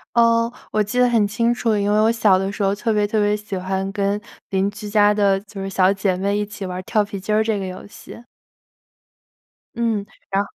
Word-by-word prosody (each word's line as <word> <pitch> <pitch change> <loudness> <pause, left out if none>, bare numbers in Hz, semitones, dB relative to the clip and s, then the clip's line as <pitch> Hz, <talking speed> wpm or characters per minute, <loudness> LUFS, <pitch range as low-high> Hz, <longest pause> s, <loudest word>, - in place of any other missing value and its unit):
呃， 230 0 +4 0.2
我 215 - +1
记 210 +5 -3
得 250 - +5
很 225 -4 +2
清 235 +3 +1
楚， 225 -3 0
因 205 0 0
为 210 - +3
我 225 +1 +4
小 210 -5 +3
的 195 +1 -2
时 205 -1 -3
候 195 0 +2
特 225 +2 -1
别 210 -1 +2
特 215 +1 0
别 205 0 +2
喜 205 -2 -6
欢 190 +1 -2
跟 200 0 -1 0.3
邻 195 +1 +1
居 210 0 -8
家 210 0 +4
的 200 -2 +2
就 200 -1 -9
是 195 - -4
小 190 0 +3
姐 195 -2 0
妹 200 +2 0
一 210 - -1
起 200 -1 -7
玩 185 0 -5
跳 210 +2 +1
皮 200 -1 -6
筋 210 +3 -3
儿 215 - +3
这 220 -2 -1
个 195 - -4
游 185 - -8
戏。 215 - -12 1.6
嗯， 225 -4 -1 0.3
然 195 +1 +2
205 Hz, 245 characters per minute, -21 LUFS, 195-215 Hz, 1.6 s, 得